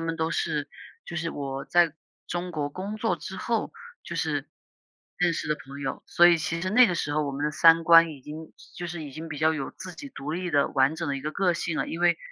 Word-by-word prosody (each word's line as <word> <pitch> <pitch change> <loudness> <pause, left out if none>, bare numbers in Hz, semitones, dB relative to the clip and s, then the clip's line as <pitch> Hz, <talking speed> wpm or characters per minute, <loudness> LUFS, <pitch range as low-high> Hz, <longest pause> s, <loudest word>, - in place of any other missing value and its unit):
们 165 0 -2
都 160 0 -1
是 150 -4 -1 0.4
就 170 - -7
是 165 0 -2
我 135 -1 -5
在 170 -3 +3 0.3
中 175 +1 -3
国 150 -4 -2
工 195 +7 -5
作 225 +1 0
之 - - -8
后， - - -1 0.3
就 - - -7
是 - - -1 0.7
认 175 -1 +2
识 155 - -4
的 150 - +1
朋 140 +1 -9
友。 135 -1 -4
所 175 - +6
以 170 - +5
其 165 +1 -2
实 185 +1 -2
那 250 +3 +7
个 180 - -1
时 145 -3 -2
候， 150 0 +1
我 140 - -3
们 145 +2 -3
的 150 - +1
三 165 +2 +6
观 165 0 +7
已 140 -3 -10
经 155 +3 -9 0.2
就 175 - -4
是 170 -2 -6
已 145 - -8
经 160 +4 -8
比 145 -3 -6
较 160 +1 +3
有 135 -3 -4
自 185 -1 -9
己 280 - -9
独 150 - -6
立 180 +1 -3
的 145 -2 +3
完 135 +2 +2
整 160 - -4
的 140 - -1
一 135 - -5
个 155 +2 -4
个 180 -3 +2
性 165 -1 -2
了。 - - -1
因 165 - -5
为 175 -2 +3
160 Hz, 280 characters per minute, -26 LUFS, 145-175 Hz, 0.7 s, 那